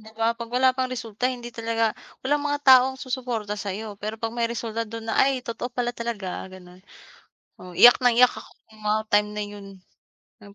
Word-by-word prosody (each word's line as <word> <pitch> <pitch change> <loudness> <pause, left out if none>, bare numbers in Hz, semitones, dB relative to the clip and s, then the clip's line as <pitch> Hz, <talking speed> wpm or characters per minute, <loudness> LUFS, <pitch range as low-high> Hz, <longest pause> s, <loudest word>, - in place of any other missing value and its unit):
'di 220 0 -14
ba, 225 - +2
'pag 230 -1 -7
wala 260 0 +5
pang 255 -1 -1
resulta 230 -1 -6
hindi 240 -1 -8
talaga 230 0 0 0.4
walang 290 +2 +1
mga 290 0 0
taong 260 0 +7
susuporta 245 -5 -3
sayo, 205 +3 -4
pero 215 +1 -3
'pag 225 -1 -3
may 235 -1 +1
resulta 230 -1 -3
do'n 230 0 -7
na, - - 0
"Ay 275 - +2
totoo 230 +1 -4
pala 245 -1 -2
talaga," 230 -5 -3 0.3
gano'n, 180 -1 -14 0.8
oo. 180 -1 -10
Iyak 245 +2 +10
nang 245 -1 +4
iyak 250 0 +6
ako - - -11 0.2
no'ng 220 -1 -19
mga 215 +1 +2
time 210 0 +4
na 210 - -1
'yon 205 -1 -10 0.8
yung 200 0 -14
230 Hz, 200 wpm, -24 LUFS, 210-245 Hz, 0.8 s, Iyak